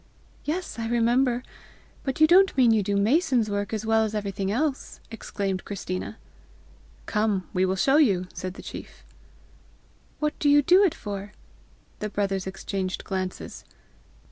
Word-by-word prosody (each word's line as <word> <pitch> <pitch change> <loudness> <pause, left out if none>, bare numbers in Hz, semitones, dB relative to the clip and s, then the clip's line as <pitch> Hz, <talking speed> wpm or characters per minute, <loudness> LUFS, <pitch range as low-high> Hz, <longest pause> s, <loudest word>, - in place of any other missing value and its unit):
"Yes, 330 -4 -3
I 225 - -2
remember. 240 +2 +2 0.6
But 265 0 -3
you 310 - +8
don't 370 +1 +5
mean 245 -3 +6
you 220 -1 +3
do 200 +1 -1
mason's 235 - +2
work 205 0 -2
as 220 -1 -3
well 220 0 +3
as 215 0 -2
everything 200 -2 -2
else?" 275 +6 -2
exclaimed 200 -4 -3
Christina. 195 +1 -5 0.9
"Come; 210 -3 0
we 185 0 +2
will 190 - 0
show 270 +9 +3
you," 200 - +3
said 185 0 -5
the - - -10
chief. - - -10 1.1
"What 300 0 0
do 290 - +3
you 290 0 +6
do 365 +7 +6
it 375 - +2
for?" 205 -1 -6 0.7
The 210 - -3
brothers 195 -2 -1
exchanged 190 0 -4
glances. 185 -1 -5
215 Hz, 150 wpm, -26 LUFS, 195-265 Hz, 1.1 s, you